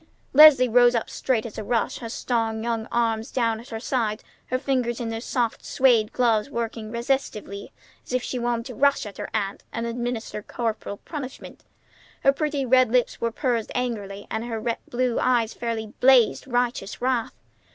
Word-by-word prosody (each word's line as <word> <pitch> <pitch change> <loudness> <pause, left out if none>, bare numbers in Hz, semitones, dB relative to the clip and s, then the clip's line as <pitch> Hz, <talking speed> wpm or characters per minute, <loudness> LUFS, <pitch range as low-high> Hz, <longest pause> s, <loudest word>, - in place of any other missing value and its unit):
Leslie 275 -3 +9
rose 245 +1 +5
up 230 - -2
straight 245 -4 0
as 225 - -7
a - - -4
rush, 230 +2 -1
her 230 - -6
strong 225 -2 -1
young 230 -1 -2
arms 230 0 0
down 230 -3 0
at 240 +4 -13
her 225 - -5
sides, 225 -3 -1 0.2
her 255 - 0
fingers 255 -3 -1
in 235 -2 -3
their 225 0 -4
soft 240 -2 -1
suède 235 -5 +3
gloves 230 -1 +2
working 230 -3 -4
restively 235 -5 -2 0.3
as - - -12
if 255 -1 0
she 255 - -3
wanted 235 -1 -1
to 250 - -7
rush 280 +2 +2
at 205 -2 -9
her - - -5
aunt 200 -2 -2
and 230 - -3
administer 235 -2 -3
corporal 220 -2 -4
punishment. 275 -1 -8 0.6
Her 275 - +5
pretty 290 -2 -1
red 255 -2 +4
lips 250 -1 +1
were 230 - 0
pursed 235 -3 -1
angrily, 205 -5 -3
and 220 +1 -2
her 230 0 -2
blue 245 -1 0
eyes 240 -3 +2
fairly 225 -2 -4
blazed 255 -1 +5
righteous 245 -5 -1
wrath. 245 -2 -1
235 Hz, 175 wpm, -24 LUFS, 225-255 Hz, 0.6 s, Leslie